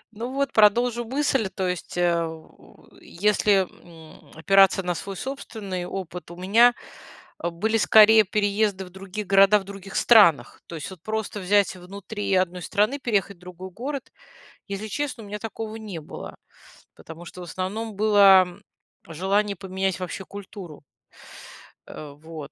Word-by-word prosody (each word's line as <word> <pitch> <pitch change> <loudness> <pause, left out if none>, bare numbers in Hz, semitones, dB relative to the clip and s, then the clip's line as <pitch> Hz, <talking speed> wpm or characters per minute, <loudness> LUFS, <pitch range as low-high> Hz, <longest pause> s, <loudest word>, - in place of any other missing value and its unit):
Ну, 235 +4 -5
вот, 275 0 -1
продолжу 235 +3 +3
мысль, 265 -4 0
то 190 -2 -3
есть, 180 0 -5
э, 170 -2 0 0.6
если, 200 0 +1 0.2
м, 160 -2 -16
опираться 195 +2 +4
на 180 0 -1
свой 195 +3 -7
собственный 205 -9 -6
опыт, 180 -2 -7
у 175 - -10
меня, 225 +7 +4 0.7
э, 170 - -1
были 220 +7 -1
скорее 220 0 +6
переезды 205 0 0
в 180 - -12
других 190 +2 -7
городах 195 +1 +5
в - - -11
других 195 0 -10
странах. 170 - +5
То 170 - -8
есть 155 - -6
вот 180 -4 -12
просто 215 0 -4
взять 200 +1 +2
внутри 200 +3 -5
одной 185 -1 0
страны, 210 +10 0
переехать 200 -6 -1
в - - -30
другой 180 +1 -10
город- 260 +7 -6 0.6
если 200 +2 -5
честно, 260 +2 -4
у 210 - -11
меня 210 +1 -6
такого 220 0 -6
не 210 -7 -7
было. 155 - -9 0.6
Потому 165 +1 -12
что, 180 - -11
в 180 - -7
основном, 200 +5 -5
было 200 -3 +6 0.6
желание 195 +5 0
поменять 190 0 -3
вообще 185 +1 -6
культуру. 190 -6 -10 1.0
Э, 150 -2 -9
вот. 155 -1 -10
195 Hz, 150 wpm, -24 LUFS, 180-215 Hz, 1.0 s, скорее